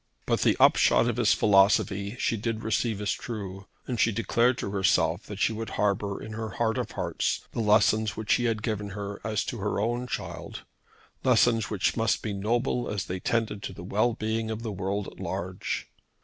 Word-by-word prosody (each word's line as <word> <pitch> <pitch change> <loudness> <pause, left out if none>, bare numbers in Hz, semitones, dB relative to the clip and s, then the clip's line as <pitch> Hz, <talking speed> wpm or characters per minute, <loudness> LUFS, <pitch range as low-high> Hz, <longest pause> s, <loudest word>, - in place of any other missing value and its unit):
But - - +1
the - - +3
upshot 120 - +5
of 120 -1 -1
his 120 -3 +4
philosophy 100 0 +3
she 115 - 0
did 115 +1 -3
receive 110 0 0
as 105 - 0
true, 100 -4 -6 0.2
and 120 -3 -3
she 115 - +4
declared 115 +3 +2
to 100 - -4
herself 90 -2 +1
that 105 - -7
she 110 - +2
would 110 +1 -5
harbour 100 -1 0
in 110 - -7
her 110 0 -4
heart 110 -1 +1
of - - -4
hearts - - -1
the - - -5
lessons 110 0 +3
which 110 -1 +1
he 120 - +1
had 110 -2 0
given 105 -3 -2
her 100 0 -5
as 110 -1 -1
to 120 - -4
her 105 0 -1
own 120 +4 -1
child, - - -6 0.6
lessons 115 -3 +3
which 100 -3 0
must 115 -1 +1
be 105 - -2
noble 120 +5 0
as 100 -3 -2
they 90 +1 -4
tended 110 -1 -1
to 95 - -5
the 90 - -9
well 105 +6 +1
being 110 +1 -2
of 110 +1 -4
the 110 - -3
world 100 +1 -2
at - - -11
large. - - -4
110 Hz, 200 wpm, -27 LUFS, 100-115 Hz, 0.6 s, upshot